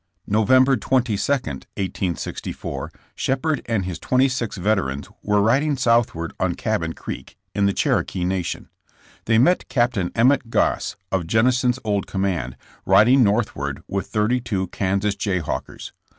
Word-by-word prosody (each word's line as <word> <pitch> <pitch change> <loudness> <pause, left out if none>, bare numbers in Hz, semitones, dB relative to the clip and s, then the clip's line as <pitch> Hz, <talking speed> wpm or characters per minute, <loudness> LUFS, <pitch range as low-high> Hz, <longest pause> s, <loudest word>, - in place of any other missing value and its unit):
November 130 +6 +4
22, 125 -1 +1
1864, 85 - -3 0.2
Shepherd 140 +2 -1
and 110 -5 0
his 90 -2 -5
twenty 130 +1 +3
six 125 -5 -3
veterans 90 -8 -1
were 105 -1 +2
riding 140 +6 +2
southward 115 -9 +1
on - - 0
Cabin - - -1
Creek, 65 - -8 0.2
in 100 -1 +2
the - - +3
Cherokee 90 -1 0
nation. 90 -1 -2 0.6
They 115 0 +3
met 175 +10 +3
Capt. 120 -4 +1 0.2
Emmet 125 +1 +3
Goss - - 0 0.2
of 95 -4 -1
Jennison's 125 +4 +2
old 100 -3 -1
command, 90 -10 -2 0.3
riding 110 +8 +5
northward 100 -11 -1
with 95 0 -3
thirty 110 +4 +1
two 100 -6 -2
Kansas 100 +1 0
Jayhawkers. 95 -5 -3
105 Hz, 130 wpm, -22 LUFS, 95-125 Hz, 0.6 s, riding